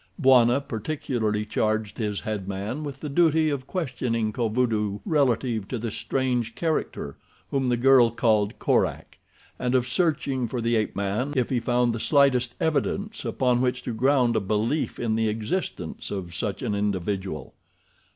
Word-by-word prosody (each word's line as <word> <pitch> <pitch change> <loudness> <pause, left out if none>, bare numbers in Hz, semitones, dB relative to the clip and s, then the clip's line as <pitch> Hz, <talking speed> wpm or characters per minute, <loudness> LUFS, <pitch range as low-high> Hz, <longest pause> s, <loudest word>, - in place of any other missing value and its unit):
Bwana 130 -3 +5
particularly 110 -3 -2
charged 110 0 -1
his 105 -3 -2
head 105 -3 -4
man 100 +9 -4
with 140 -3 -7
the 150 - -4
duty 160 +1 +3
of 135 -2 -4
questioning 120 - -2
Kovudoo 110 -3 0
relative 125 - +1
to 125 - -3
the 115 0 -4
strange 125 -3 -1
character 155 - -2 0.3
whom 135 -2 +1
the 120 - +2
girl 125 -1 +6
called 110 -3 +1
Korak, - - 0 0.4
and 125 +1 0
of 125 -1 +2
searching 135 -4 0
for 125 +2 -3
the 115 0 +1
ape 110 -1 0
man 100 +8 -1
if 125 -1 0
he 125 - +2
found 120 0 +1
the 115 - -3
slightest 130 -3 +3
evidence 195 +8 -1
upon 125 -2 +1
which 125 -1 0
to 120 - -3
ground 125 0 +3
a - - +3
belief 110 +9 -1
in 115 -2 0
the 110 0 +1
existence 110 - -3
of 90 -4 -5
such 100 +4 -3
an 115 -4 -1
individual. 95 -6 -2
120 Hz, 160 wpm, -25 LUFS, 110-135 Hz, 0.4 s, girl